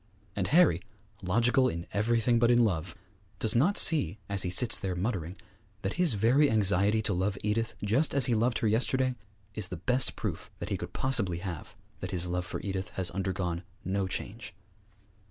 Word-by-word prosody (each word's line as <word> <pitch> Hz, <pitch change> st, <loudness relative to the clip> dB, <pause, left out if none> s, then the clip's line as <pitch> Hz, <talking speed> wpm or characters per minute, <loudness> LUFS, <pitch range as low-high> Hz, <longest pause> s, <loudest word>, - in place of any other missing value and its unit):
And 95 Hz, -2 st, -1 dB
Harry, 155 Hz, -, +4 dB, 0.4 s
logical 120 Hz, +7 st, +2 dB
in 85 Hz, +1 st, -5 dB
everything 115 Hz, +2 st, +2 dB
but 120 Hz, 0 st, +3 dB
in 120 Hz, -1 st, +5 dB
love, 85 Hz, -4 st, -2 dB, 0.4 s
does 110 Hz, 0 st, +1 dB
not 175 Hz, +12 st, +3 dB
see, 105 Hz, -, +3 dB
as 100 Hz, -2 st, +2 dB
he 90 Hz, -, 0 dB
sits 115 Hz, +6 st, +2 dB
there 95 Hz, -2 st, -3 dB
muttering, 90 Hz, -3 st, -3 dB, 0.5 s
that 95 Hz, -, -1 dB
his 170 Hz, -8 st, +5 dB
very 125 Hz, +8 st, +3 dB
anxiety 105 Hz, +1 st, +2 dB
to 105 Hz, -, 0 dB
love 95 Hz, +2 st, -1 dB
Edith 110 Hz, +2 st, -1 dB
just 130 Hz, +11 st, +1 dB
as 140 Hz, -4 st, +4 dB
he 125 Hz, -, +1 dB
loved 115 Hz, +1 st, +1 dB
her -, -, +4 dB
yesterday 130 Hz, +4 st, +1 dB, 0.4 s
is 105 Hz, -4 st, -2 dB
the 90 Hz, -, -6 dB
best 125 Hz, +9 st, +2 dB
proof -, -, -5 dB
that -, -, -6 dB
he -, -, -1 dB
could -, -, -7 dB
possibly 115 Hz, -10 st, 0 dB
have 85 Hz, -3 st, -6 dB, 0.2 s
that -, -, -5 dB
his 90 Hz, -1 st, -2 dB
love 90 Hz, 0 st, -2 dB
for -, -, -4 dB
Edith 95 Hz, -2 st, -4 dB
has 90 Hz, -2 st, +1 dB
undergone 90 Hz, -2 st, -2 dB, 0.2 s
no 95 Hz, 0 st, -1 dB
change. 100 Hz, +4 st, -5 dB
105 Hz, 185 wpm, -29 LUFS, 90-120 Hz, 0.5 s, in